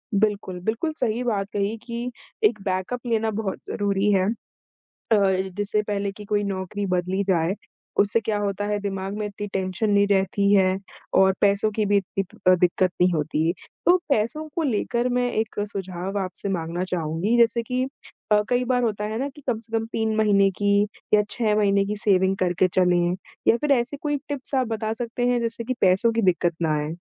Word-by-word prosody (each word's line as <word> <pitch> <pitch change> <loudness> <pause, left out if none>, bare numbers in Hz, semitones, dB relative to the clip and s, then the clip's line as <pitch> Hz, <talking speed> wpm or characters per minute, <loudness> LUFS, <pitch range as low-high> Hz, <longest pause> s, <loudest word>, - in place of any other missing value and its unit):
बिल्कुल, 200 -3 0
बिल्कुल 225 - -1
सही 240 -1 0
बात 205 -5 -1
कही 205 +2 0
कि 235 +1 -4 0.3
एक 215 -1 +3
बैकअप 190 +6 -2
लेना 225 -1 +1
बहुत 210 -2 -3
ज़रूरी 200 0 0
है। 190 -2 +3 0.9
अ, - - +7 0.4
जिससे 205 +1 0
पहले 200 -1 -1
कि 210 +1 -10
कोई 205 0 0
नौकरी 200 +1 -3
बदली 185 +1 0
जाए 180 -1 +1 0.4
उससे 205 +3 +4
क्या 210 -1 -1
होता 205 0 -2
है 210 0 0
दिमाग 195 -1 -4
में 210 - -2
इतनी 205 0 -6
टेंशन 190 +3 -1
नहीं 200 0 +4
रहती 200 0 +2
है 190 -1 +4 0.4
और 190 0 +5
पैसों 200 +1 +3
की 215 - +2
भी 200 0 +3
इतनी 195 0 -2
प 215 +4 -19
अ, 185 - +8
दिक़्क़त 180 +1 +2
नहीं 180 0 +5
होती। 155 +1 0 0.3
तो 355 - +7
पैसों 280 +6 0
को 335 - 0
लेकर 240 -1 0
मैं 245 0 +1
एक 220 -2 -2
सुझाव 190 -1 -4
आपसे 185 +2 -4
माँगना 170 -1 -2
चाहूँगी 180 +5 -1
जैसे 235 0 +3
कि 250 +2 -1 0.5
अ, 210 0 +6
कई 250 0 +2
बार 250 0 +1
होता 210 -3 -1
है 215 +1 -3
ना, 275 +2 -1
कि 295 +2 -15
कम 240 - +1
से 225 0 -3
कम 225 - -2
3 220 -1 0
महीने 200 -2 +4
की 200 +2 +1 0.4
या 210 - +7
6 220 -3 +1
महीने 200 -1 +3
की 210 - -2
सेविंग 190 -2 +3
करके 180 0 +2
चलें 180 -1 +2 0.3
या 230 - +6
फ़िर 295 +3 -1
ऐसे 260 +2 +1
कोई 295 0 -1
टिप्स 280 -1 -3
आप 260 -2 +2
बता 220 -1 -2
सकते 235 +1 -3
हैं 245 0 +2
जिससे 230 0 -2
कि 255 +3 -2
पैसों 195 +5 +4
की 230 - +1
दिक़्क़त 175 -3 +2
ना 155 -2 +2
आए? 150 +2 -3
205 Hz, 195 wpm, -24 LUFS, 190-230 Hz, 0.9 s, अ